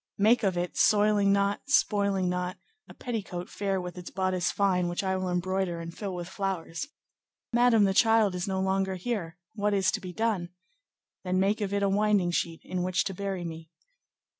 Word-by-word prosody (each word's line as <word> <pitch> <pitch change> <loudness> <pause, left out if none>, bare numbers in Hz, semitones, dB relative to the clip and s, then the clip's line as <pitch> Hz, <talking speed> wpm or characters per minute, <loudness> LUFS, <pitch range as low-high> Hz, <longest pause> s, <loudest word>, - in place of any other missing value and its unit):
Make 220 +5 +4
of 190 -4 0
it, 175 0 -2
soiling 205 -1 +4
not, 200 0 +1
spoiling 200 -8 +2
not, 180 +1 -2 0.3
a - - -10
petticoat 195 -7 -5
fair 195 -2 -1
with 180 0 -6
its 180 - -8
bodice 185 -1 0
fine, 185 -3 +1
which 175 +3 -2
I 190 0 0
will 185 -1 -2
embroider 180 0 -1
and 170 0 -7
fill 195 -3 -4
with 175 -1 -5
flowers.'—'Madame, 205 - -1
the 195 -1 +3
child 225 -1 +4
is 180 +2 -3
no 190 -1 -1
longer 190 0 0
here; 185 -4 -4 0.2
what 210 -1 0
is 195 -1 +2
to - - -3
be 185 - -6
done?'—'Then 185 - -4
make 200 +3 +1
of 200 -1 -1
it 200 0 0
a - - +3
winding 200 -2 +2
sheet 165 -1 -2
in 185 -1 -3
which 180 0 +1
to 195 - -3
bury 190 -2 -4
me. 160 -1 -7
190 Hz, 185 wpm, -28 LUFS, 180-205 Hz, 0.3 s, Make